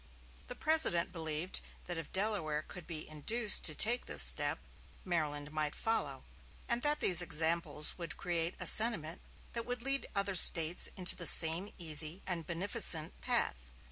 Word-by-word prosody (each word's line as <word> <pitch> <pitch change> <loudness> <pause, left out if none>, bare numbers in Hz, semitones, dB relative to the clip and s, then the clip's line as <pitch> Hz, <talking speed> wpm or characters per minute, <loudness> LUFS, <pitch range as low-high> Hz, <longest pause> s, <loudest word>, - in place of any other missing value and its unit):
The - - -11
President 250 - 0
believed 160 +1 -5 0.2
that 175 - -8
if 165 - -13
Delaware 190 -7 -4
could 180 -3 -13
be 155 -2 -7
induced 210 +9 +3
to 155 - +3
take 235 +8 +2
this - - +6
step, - - -1 0.5
Maryland 150 -4 -6
might 155 -1 -5
follow, 225 0 -5 0.4
and 235 0 -3
that 295 +2 -2
these 180 -2 +3
examples 160 -1 +1
would 165 -4 -9
create 170 -1 -4
a - - -8
sentiment 195 -8 +2 0.3
that 235 0 -9
would 245 -1 -6
lead 275 +1 -2
other 200 0 -4
States 170 -2 +5
into 185 -1 0
the 170 - -1
same 165 +5 +5
easy 160 +1 -1
and 170 -4 -8
beneficent 170 -2 -1
path. - - -2
170 Hz, 155 wpm, -29 LUFS, 155-200 Hz, 0.5 s, this